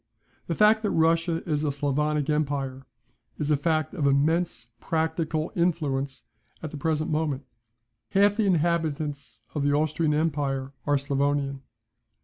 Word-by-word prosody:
The 165 - -1
fact 215 +3 +5
that 210 - 0
Russia 165 0 +1
is 150 -2 0
a 150 - +1
Sclavonic 145 +1 0
empire, 140 -3 -1 0.5
is 150 0 -1
a - - +5
fact 155 +1 0
of 155 -7 0
immense 145 -2 +1
practical 160 -1 -1
influence 145 -6 0 0.4
at 155 - -4
the - - -7
present 155 +2 -1
moment. 150 -3 -1 0.6
Half 205 +1 +3
the 215 -3 +2
inhabitants 150 -8 -1
of 150 - -1
the 145 0 +2
Austrian 155 +1 +1
empire 140 -3 -1
are 145 - +4
Sclavonian. 140 0 0
150 Hz, 135 wpm, -26 LUFS, 140-165 Hz, 0.6 s, fact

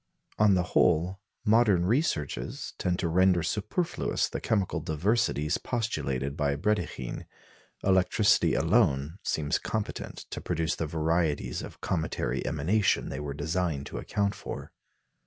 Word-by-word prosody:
On 105 -2 +6
the 90 - +2
whole, 90 +3 +3 0.3
modern 105 -5 +4
researches 100 - -1
tend 90 -1 0
to 90 - -1
render 90 0 +3
superfluous 135 - -1
the - - -4
chemical 100 -5 0
diversities 80 0 0
postulated 70 - -2
by 70 -2 0
Brédikhine. 90 - -2 0.6
Electricity 95 +3 +3
alone 70 +7 +2
seems 75 +1 0
competent 110 -2 -4
to - - -4
produce 80 0 -1
the 80 - -2
varieties 80 0 0
of - - -10
cometary 85 -3 -1
emanation 95 +8 +1
they - - -4
were 70 -1 -4
designed 80 -1 -1
to - - -6
account 100 -1 -1
for. - - -7
85 Hz, 125 wpm, -28 LUFS, 75-100 Hz, 0.6 s, On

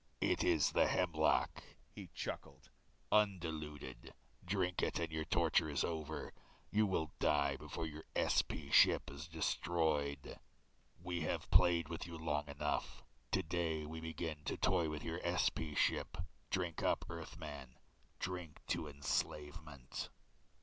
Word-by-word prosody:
"It - - +2
is - - +4
the - - +4
hemlock," 80 -4 +2 0.3
he - - -9
chuckled, - - -6 0.4
"undiluted. 80 -8 0 0.3
Drink 90 -1 0
it - - +1
and 85 -2 -1
your 80 0 -2
torture 80 - +3
is 70 - +1
over. 80 -2 -3 0.4
You 105 0 +4
will 80 -6 -1
die 70 -1 +3
before 80 - -5
your 80 0 -7
SP - - +2
ship - - +6
is 70 +4 -7
destroyed. 80 -3 0 0.6
"We 90 -1 -2
have 80 - -2
played 85 -3 +5
with 85 +1 -5
you 85 -1 -6
long 75 -2 -1
enough. 70 0 -2 0.3
Today 80 -2 0
we 80 +2 -5
begin 80 -1 -4
to - - -1
toy 90 -4 +3
with 75 -1 -4
your 80 +2 -3
SP 85 -3 0
ship. - - +2 0.3
Drink 90 -4 -1
up, - - +2
Earthman, 75 -6 -7 0.4
drink 90 -4 -4
to 75 - 0
enslavement." 70 -1 -3
80 Hz, 130 wpm, -38 LUFS, 75-85 Hz, 0.6 s, ship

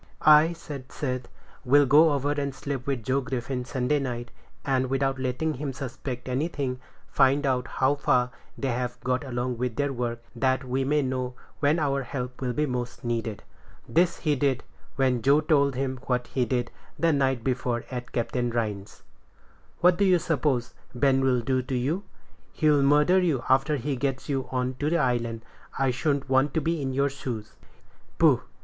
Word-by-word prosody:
"I," 155 +2 +7
said 140 -5 -9
Seth, 130 -3 -3 0.4
"will 140 +3 +5
go 150 +3 +6
over 140 +1 0
and 140 -2 -2
sleep 135 -3 -5
with 135 -4 -1
Joe 130 +4 +1
Griffin 130 -1 -3
Sunday 130 +3 0
night, 120 -3 -4 0.3
and, 130 -2 +1
without 135 0 0
letting 130 +5 -1
him 140 0 -4
suspect 130 -1 -6
anything, 130 -1 -2 0.3
find 140 +1 +3
out 130 -2 0
how 130 +2 +1
far 125 -3 +1 0.3
they've 125 -2 -2
got 130 +2 0
along 125 -2 -3
with 125 -2 -2
their 145 -1 0
work, 120 -1 -3
that 130 +2 +1
we 130 +1 -1
may 145 +2 +2
know 130 -1 -2 0.2
when 150 +2 +3
our 140 -3 0
help 125 -1 -5
will 125 -1 -1
be 150 +5 0
most 125 -3 -4
needed." 115 -3 -3 0.4
This 170 +1 +2
he 150 -3 +1
did, 135 -1 0 0.3
when 130 -3 +1
Joe 140 +4 +5
told 145 -3 +2
him 130 0 -2
what 125 -1 0
he 130 -2 -1
did 120 -1 -1 0.3
the 165 -1 +3
night 135 -4 +1
before 125 -2 -1
at 125 -1 -5
Captain 120 +1 -1
Rhines's. 105 -4 -4 0.8
"What 180 +1 +5
do - - +4
you 185 -2 +5
suppose 145 -7 0 0.2
Ben'll 130 -1 +3
do 130 +2 0
to 130 +1 -4
you? 150 +11 -1 0.5
He'll 150 -3 +3
murder 150 +6 +4
you 160 -8 +1
after 135 +3 +3
he 140 +2 -2
gets 135 0 -2
you 135 -3 -2
on 130 0 -1
to 145 - 0
the 170 - +2
island. 120 -5 -1 0.3
I 135 -1 +2
shouldn't 140 +2 -1
want 135 +1 +2
to - - +3
be 165 0 -1
in 135 -1 -2
your 140 +1 +1
shoes." 120 -6 -6 0.6
"Poh! - - +5
130 Hz, 175 wpm, -26 LUFS, 125-145 Hz, 0.8 s, I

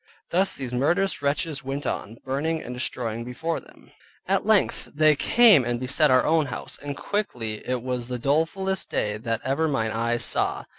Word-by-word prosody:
Thus 190 +3 +3
these 130 -3 -6
murderous 170 +10 +1
wretches 145 +1 -1
went 135 +2 -4
on, 115 +3 -4
burning, 150 +5 -1
and 125 - -7
destroying 115 -2 -3
before 160 +7 -3
them. - - -19 0.4
At - - +1
length - - +2
they 155 0 +5
came 210 - +6
and 120 0 -2
beset 140 +4 +2
our 130 0 +4
own 155 -2 +2
house, - - -6
and 145 -1 -5
quickly 120 - -3
it 125 -2 -1
was 125 -2 -3
the 125 0 -3
dolefulest 165 +9 0
day 105 0 -1
that 115 0 -3
ever 140 +5 +1
mine 115 -7 0
eyes 115 +2 -1
saw. - - 0
135 Hz, 180 wpm, -25 LUFS, 120-160 Hz, 0.4 s, came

